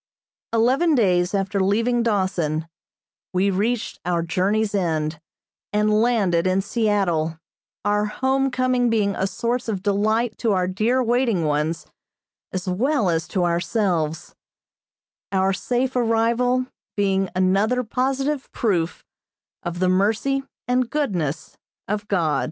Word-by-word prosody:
Eleven 260 +8 +3
days 180 -5 +2
after 195 +1 -1
leaving 230 +5 +2
Dawson 185 -8 0 0.7
we 190 +2 +2
reached 220 +5 -1
our 175 -1 0
journey's 200 +5 0
end, 160 -5 -1 0.5
and 210 +1 +2
landed 195 -8 +2
in 185 +1 +2
Seattle, 195 -7 0 0.5
our 210 0 +2
home 265 +5 0
coming 255 -1 +1
being 205 -3 +1
a 190 - 0
source 235 +4 -2
of 195 -4 -3
delight 215 +3 +1
to 225 -4 +1
our 185 -1 +1
dear 225 +7 +1
waiting 235 -7 +1
ones, 150 +2 -1 0.7
as 185 0 -4
well 215 - +1
as 165 -1 -1
to 185 - -1
ourselves; 170 -3 -1 1.0
our 190 0 +2
safe 250 +6 -1
arrival 240 +2 +2 0.3
being 195 -2 +1
another 200 +7 +2
positive 270 +4 -1
proof 180 -8 -1 0.6
of 175 -2 -4
the 185 +1 +1
mercy 220 +9 +1 0.3
and 250 -1 +1
goodness 175 - -2 0.3
of 210 0 -3
God. 165 -8 +1
205 Hz, 125 wpm, -22 LUFS, 180-240 Hz, 1.0 s, Eleven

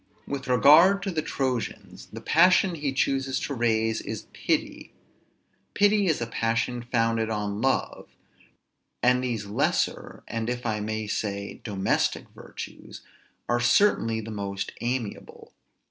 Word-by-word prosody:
With 140 -1 -5
regard 160 +10 +6
to 195 - -2
the 160 -3 -1
Trojans, 130 -5 -4
the - - -8
passion 180 +2 +4
he 145 -4 -2
chooses 135 0 0
to 140 - -3
raise 115 -2 +1
is - - -6
pity; - - -2 0.8
pity 205 -1 +3
is 160 - +1
a 120 - -2
passion 115 +1 -1
founded 115 -1 +1
on 105 -1 -3
love; 135 +1 -1 0.9
and 125 +1 +3
these 115 -5 -2
lesser, 100 - -1
and 115 0 -3
if 125 0 -4
I 110 -2 -1
may 110 +1 -3
say 100 -1 -4
domestic 100 -4 0
virtues, - - -10 0.5
are 120 - +1
certainly 120 - +3
the 110 +1 -8
most 100 -2 -4
amiable. 120 -3 -5
120 Hz, 130 wpm, -26 LUFS, 110-135 Hz, 0.9 s, regard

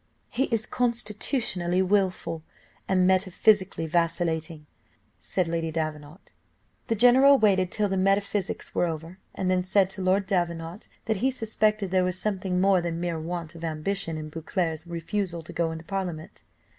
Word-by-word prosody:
"He 265 - 0
is 225 -4 -1
constitutionally 215 -6 0
wilful, 185 -4 0 0.5
and 185 -1 +3
metaphysically 190 0 +2
vacillating," 165 -1 -1 0.5
said 185 -3 -1
Lady 165 -1 -1
Davenant. 155 +1 -5 0.5
The 225 - +1
general 260 +5 +6
waited 190 -5 +2
till 210 -1 +1
the 190 -1 -1
metaphysics 195 0 0
were 175 - +1
over, 165 +3 -6 0.2
and 185 -1 0
then 180 0 +2
said 190 0 +2
to 190 - -6
Lord 190 +2 +2
Davenant 170 -1 -2 0.2
that 220 -2 0
he 255 +7 +2
suspected 215 -5 0
there 185 -1 +3
was 180 0 -1
something 185 -2 -1
more 190 -1 +4
than 170 -1 -3
mere 170 -2 -2
want 165 0 -5
of 165 0 -11
ambition 165 +1 -2
in 155 0 -6
Beauclerc's 165 +1 -3
refusal 170 +1 -3
to - - -10
go 165 -1 0
into 160 0 -8
parliament. 180 -5 -5
185 Hz, 155 wpm, -26 LUFS, 165-200 Hz, 0.5 s, general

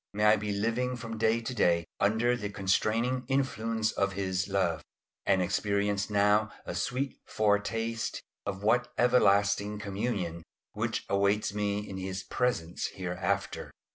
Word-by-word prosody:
May 105 +1 +2
I 105 +1 +7
be 105 0 -3
living 115 +5 0
from 115 -2 -6
day 115 +1 +3
to 120 +2 -4
day 85 -7 +2
under 110 +4 +3
the 105 -4 -4
constraining 110 +6 +1
influence 115 -5 0
of 100 0 0
His 95 0 -1
love, 90 -5 0 0.5
and 95 -1 +4
experience 100 +1 0
now 105 +1 +3 0.2
a - - -4
sweet 135 +2 -2
foretaste 110 +2 0 0.2
of 95 - -4
that 115 +4 +3
everlasting 100 -4 +3
communion 100 -4 -3 0.3
which - - -2
awaits 100 +1 +1
me 105 0 -1
in 95 - -6
His 95 0 -4
presence 90 -10 -1
hereafter. 95 +2 -2
105 Hz, 140 wpm, -30 LUFS, 100-115 Hz, 0.5 s, I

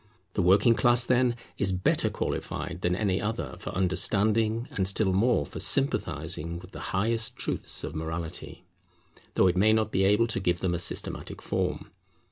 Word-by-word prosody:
The - - 0
working 100 +6 +5
class, 120 0 +3
then, 125 -1 +2 0.2
is 100 -1 +1
better 90 0 +1
qualified 85 +4 -4
than 90 0 +1
any 95 -1 0
other 110 +2 -3
for - - -6
understanding, 110 +5 +1
and 95 -1 -1
still 100 0 +2
more 100 - +2
for - - -8
sympathizing 85 - +1
with 90 +2 -12
the - - -9
highest 110 +3 -1
truths - - -3
of - - -5
morality, 80 +1 -6 0.7
though - - +4
it 90 -1 +3
may 105 +4 +4
not 110 -1 +1
be 95 - +1
able 105 +4 +4
to 110 -4 -2
give 90 -2 -1
them 90 -2 0
a 85 - -1
systematic 90 - -2
form. - - -3
95 Hz, 170 wpm, -27 LUFS, 90-110 Hz, 0.7 s, working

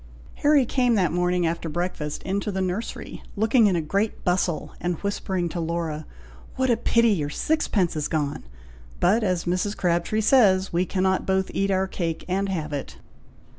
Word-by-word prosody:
Harry 290 -3 +5
came 245 -1 +2
that 185 -6 +2
morning 180 0 +1
after 165 0 -2
breakfast 155 -2 -3
into 200 +2 -2
the 190 - -3
nursery, 190 +4 -4
looking 220 +2 +4
in 190 - +2
a 170 - +1
great 200 +7 -1
bustle, 180 -2 0
and 175 0 -1
whispering 190 -3 -1
to 170 +1 -4
Laura, 165 -2 -3 0.5
"What 260 -1 +1
a - - +4
pity 230 0 +3
your 155 -9 0
sixpence 205 - 0
is 150 -1 -1
gone! 150 -2 -2 0.6
but 215 +6 +3
as 185 -4 0
Mrs. 180 +4 -1
Crabtree 175 +4 +1
says, 200 -6 +4
'we 175 +2 +1
cannot 190 0 0
both 190 0 +1
eat 195 0 0
our 190 0 +2
cake 170 -4 -3
and 195 +2 0
have 155 -5 -3
it!'" 140 - -5
185 Hz, 170 wpm, -24 LUFS, 170-205 Hz, 0.6 s, Harry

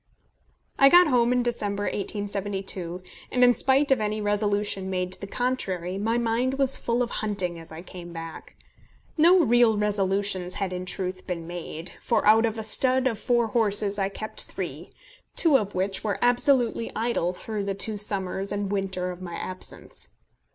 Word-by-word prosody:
I 275 - +8
got 355 +4 +8
home 240 -2 +3
in 250 0 +2
December, 205 -4 -2
1872, 195 -3 -3 0.3
and 250 - +3
in 245 0 +7
spite 270 +3 +3
of 260 -4 +3
any 215 0 -1
resolution 205 -2 0
made 180 -1 -2
to - - -6
the 200 - -5
contrary, 195 -7 -2
my 225 +3 0
mind 240 +3 0
was 270 -1 +3
full 240 +1 0
of 240 - -5
hunting 185 -5 -2
as 165 - -11
I 160 +2 -8
came 175 -2 -10
back. 165 -1 -9 0.6
No 345 +3 +6
real 240 -4 +4
resolutions 195 -3 0
had 195 -2 -2
in 180 0 -5
truth 185 0 -4
been 170 -2 -4
made, 170 0 -6
for 235 - +1
out 220 +2 +6
of 225 0 -4
a 220 - -4
stud 255 +4 +2
of 230 -5 0
four 240 -1 +1
horses 205 -2 +2
I 195 0 +1
kept 215 +2 -3
three, - - -6 0.5
two 320 -5 +4
of 205 -7 +1
which 190 +1 -1
were 210 -2 -1
absolutely 245 -1 +2
idle 225 -6 0
through 205 +2 -5
the 195 -1 -2
two 210 +1 -1
summers 195 -1 -1
and 205 -1 -2
winter 190 -2 -2
of 180 0 -10
my 175 -2 -6
absence. 185 0 -5
205 Hz, 175 wpm, -26 LUFS, 185-235 Hz, 0.6 s, I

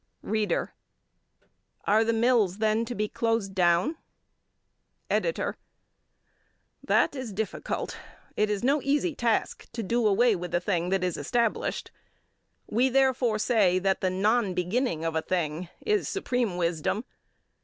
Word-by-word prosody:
READER: 215 -1 -1 1.1
Are 215 +2 +4
the 225 - +1
mills, 225 -5 +2
then, 220 +1 +1
to 240 +1 -5
be 210 0 -1
closed 225 -3 -1
down? 180 - +2 1.1
EDITOR: - - 0 1.3
That - - +2
is 260 -4 -5
difficult. 210 +2 -4 0.4
It 210 0 +1
is 210 +1 -2
no 280 +3 +2
easy 295 +5 +1
task 235 -5 -1
to 230 -1 -3
do 230 +3 +1
away 220 +2 +4
with 175 -1 -4
a - - +3
thing 175 -1 -1
that 190 -1 +1
is 180 -2 -1
established. 235 -3 -1 0.7
We, 245 +5 +2
therefore, 260 -4 +2
say 210 -5 +3
that 190 +1 0
the 185 - +2
non 205 +1 +1
beginning 180 -2 -1
of 165 -1 -1
a 160 - +1
thing 170 -1 -2 0.2
is, 425 -1 +1
supreme 245 - -1
wisdom. 170 +6 -1
215 Hz, 135 wpm, -27 LUFS, 185-245 Hz, 1.3 s, Are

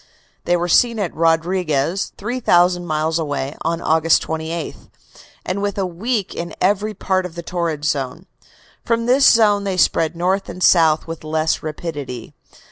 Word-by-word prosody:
They 175 0 +2
were 175 +1 -1
seen 230 +6 +3
at 200 -5 -2
Rodriguez, 165 0 0
3,000 180 -6 +1
miles 155 +1 0
away, 145 -2 -3
on 165 +1 -2
August 160 +1 +3
28, 160 0 -4 0.7
and 190 +2 -2
within 200 -1 -1
a - - 0
week 200 +4 -2
in 170 0 -6
every 205 +3 +1
part 185 0 0
of 180 -2 -8
the 170 - -6
torrid 165 -4 -3
zone. 140 +4 -2 0.6
From 230 0 0
this 260 +3 +5
zone 210 -3 +4
they 195 -2 -2
spread 165 -2 +2
north 185 +3 -1
and 185 - -5
south 160 -3 +4
with 165 -1 -7
less 155 +1 0
rapidity. 145 -6 -6
170 Hz, 155 wpm, -19 LUFS, 160-195 Hz, 0.7 s, this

